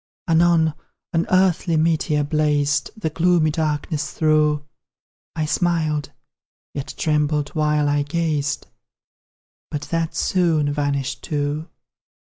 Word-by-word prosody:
Anon, 165 Hz, -1 st, +4 dB, 0.4 s
an 165 Hz, 0 st, +1 dB
earthly 185 Hz, -3 st, +3 dB
meteor 155 Hz, -2 st, +1 dB
blazed 145 Hz, -1 st, +1 dB
The 160 Hz, -8 st, -2 dB
gloomy 165 Hz, -1 st, +3 dB
darkness 150 Hz, -1 st, -2 dB
through; 150 Hz, -1 st, +2 dB, 0.7 s
I 155 Hz, -2 st, 0 dB
smiled, 155 Hz, -3 st, 0 dB, 0.6 s
yet 140 Hz, -1 st, -5 dB
trembled 150 Hz, -1 st, +1 dB
while 150 Hz, -1 st, +1 dB
I 145 Hz, 0 st, +2 dB
gazed 150 Hz, -1 st, -1 dB, 1.0 s
But 150 Hz, -2 st, -4 dB
that 165 Hz, -1 st, -1 dB
soon 160 Hz, -6 st, +1 dB
vanished 140 Hz, -2 st, -2 dB
too! 150 Hz, 0 st, -2 dB
155 Hz, 100 wpm, -22 LUFS, 145-165 Hz, 1.0 s, Anon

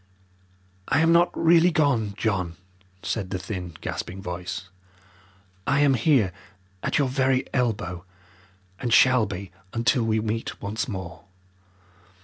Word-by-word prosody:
"I 155 Hz, -, +3 dB
am 165 Hz, +1 st, +4 dB
not 170 Hz, +1 st, +5 dB
really 170 Hz, +1 st, +5 dB
gone, 130 Hz, -, +1 dB
John," 95 Hz, -7 st, -1 dB, 0.5 s
said 90 Hz, +1 st, -2 dB
the 95 Hz, -, -2 dB
thin, 90 Hz, -3 st, -6 dB
gasping 95 Hz, -, -5 dB
voice. 90 Hz, 0 st, -5 dB, 1.0 s
"I 140 Hz, -, +3 dB
am 145 Hz, -2 st, +5 dB
here 120 Hz, -, +3 dB, 0.5 s
at -, -, 0 dB
your 140 Hz, -3 st, +2 dB
very 130 Hz, 0 st, +2 dB
elbow, 100 Hz, -8 st, -1 dB, 0.8 s
and 120 Hz, -, -2 dB
shall 125 Hz, -2 st, +5 dB
be 100 Hz, -1 st, -6 dB, 0.2 s
until 120 Hz, +2 st, +2 dB
we 110 Hz, -1 st, +1 dB
meet 110 Hz, +1 st, -3 dB
once 110 Hz, +7 st, -3 dB
more. 95 Hz, -5 st, -7 dB
110 Hz, 130 wpm, -25 LUFS, 95-130 Hz, 1.0 s, not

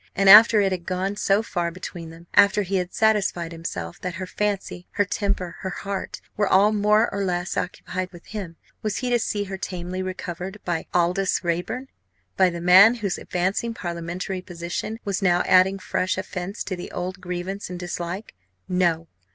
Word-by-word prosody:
And 195 Hz, 0 st, +6 dB
after 220 Hz, +1 st, +9 dB
it 195 Hz, -1 st, +2 dB
had 180 Hz, -2 st, -4 dB
gone 190 Hz, +2 st, -1 dB
so 205 Hz, +1 st, +2 dB
far 175 Hz, -6 st, -2 dB
between 170 Hz, -1 st, -8 dB
them 165 Hz, +1 st, -13 dB
after 205 Hz, 0 st, +5 dB
he 195 Hz, +1 st, -1 dB
had 180 Hz, -1 st, -2 dB
satisfied 205 Hz, -6 st, +1 dB
himself 90 Hz, -, -6 dB
that 180 Hz, -1 st, -4 dB
her 185 Hz, +1 st, -4 dB
fancy, 195 Hz, -2 st, -3 dB
her 205 Hz, -, +2 dB
temper, 195 Hz, -3 st, -2 dB
her 190 Hz, -, -4 dB
heart, 195 Hz, +1 st, -5 dB
were 205 Hz, -1 st, +1 dB
all 200 Hz, +3 st, +5 dB
more 210 Hz, +2 st, +3 dB
or 200 Hz, 0 st, -1 dB
less 175 Hz, -1 st, -2 dB
occupied 185 Hz, 0 st, -3 dB
with 175 Hz, -2 st, -14 dB
him 195 Hz, -6 st, -6 dB, 0.3 s
was 215 Hz, -3 st, -2 dB
he 250 Hz, -2 st, -2 dB
to 240 Hz, -, +3 dB
see 205 Hz, -2 st, -1 dB
her 190 Hz, -1 st, -6 dB
tamely 180 Hz, 0 st, -4 dB
recovered 185 Hz, +1 st, -5 dB
by 170 Hz, -2 st, -2 dB
Aldous 180 Hz, +2 st, +1 dB
Raeburn 180 Hz, +10 st, -2 dB, 0.5 s
by 190 Hz, -1 st, +4 dB
the 170 Hz, -1 st, -6 dB
man 190 Hz, +6 st, +8 dB
whose 205 Hz, -6 st, -3 dB
advancing 195 Hz, +6 st, -1 dB
parliamentary 175 Hz, +1 st, -4 dB
position 175 Hz, +5 st, -5 dB
was 200 Hz, 0 st, -1 dB
now 180 Hz, -2 st, +3 dB
adding 185 Hz, +1 st, +5 dB
fresh 185 Hz, -1 st, -1 dB
offence 185 Hz, +2 st, -4 dB
to 185 Hz, -, -4 dB
the 175 Hz, -, -7 dB
old 185 Hz, +1 st, -5 dB
grievance 180 Hz, +2 st, -4 dB
and 180 Hz, -, -5 dB
dislike? 175 Hz, +3 st, -5 dB, 0.3 s
No! 170 Hz, -3 st, +1 dB
185 Hz, 180 wpm, -24 LUFS, 175-200 Hz, 0.5 s, after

